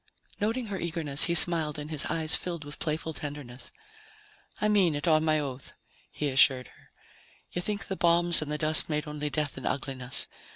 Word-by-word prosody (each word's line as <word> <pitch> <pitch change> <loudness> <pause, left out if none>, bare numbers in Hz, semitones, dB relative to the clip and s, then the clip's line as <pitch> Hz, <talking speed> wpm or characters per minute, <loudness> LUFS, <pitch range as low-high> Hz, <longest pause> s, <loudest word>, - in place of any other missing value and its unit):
Noting 225 +4 -2
her 200 -3 -6
eagerness, 160 -4 +2
he 170 - -1
smiled 160 -3 +6
and 150 +1 -8
his 150 -3 -3
eyes 160 -1 +1
filled 170 -4 -6
with 145 +1 -8
playful 160 +1 -4
tenderness. 145 -4 -8 0.9
"I 210 - 0
mean 195 -7 +2
it, 145 +3 -4
on 155 -1 +3
my 155 -1 +1
oath," 135 -2 -8 0.4
he 150 - -4
assured 130 -1 +3
her. - - -24 0.6
"You 175 - -4
think 205 +2 -4
the 190 - -4
bombs 170 -1 +2
and 150 -1 -5
the 150 - -2
dust 155 +1 +5
made 150 0 -3
only 150 0 -5
death 145 0 -3
and - - -6
ugliness. 130 -2 -2
155 Hz, 190 wpm, -27 LUFS, 145-170 Hz, 0.9 s, smiled